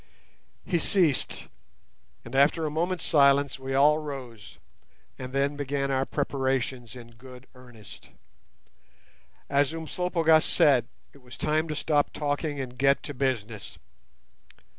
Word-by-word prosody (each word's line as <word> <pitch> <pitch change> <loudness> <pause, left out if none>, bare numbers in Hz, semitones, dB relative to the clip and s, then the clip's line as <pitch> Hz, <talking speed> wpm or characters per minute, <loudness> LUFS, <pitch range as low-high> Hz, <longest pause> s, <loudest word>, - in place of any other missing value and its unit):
He 175 - 0
ceased, 165 -5 +1 0.8
and 115 +3 -8
after 145 +4 +3
a 150 - -2
moment's 175 +3 -1
silence 140 -2 +3
we 135 0 -4
all 150 +3 +5
rose, 130 -8 -8 0.6
and 130 -1 -6
then 140 +2 0
began 140 -1 -2
our 135 0 0
preparations 130 -4 -2
in 120 -1 -12
good 125 +2 -14
earnest. 120 -6 -14 1.4
As 140 +1 +1
Umslopogaas 165 -1 +2
said, 125 -5 +3 0.3
it 140 - -18
was 125 -2 -13
time 155 +1 0
to 155 - -4
stop 150 -1 +1
"talking" 145 0 -2
and 125 -2 -6
get 140 +1 +3
to 145 - -6
business. 115 -6 -3
140 Hz, 125 wpm, -27 LUFS, 130-150 Hz, 1.4 s, all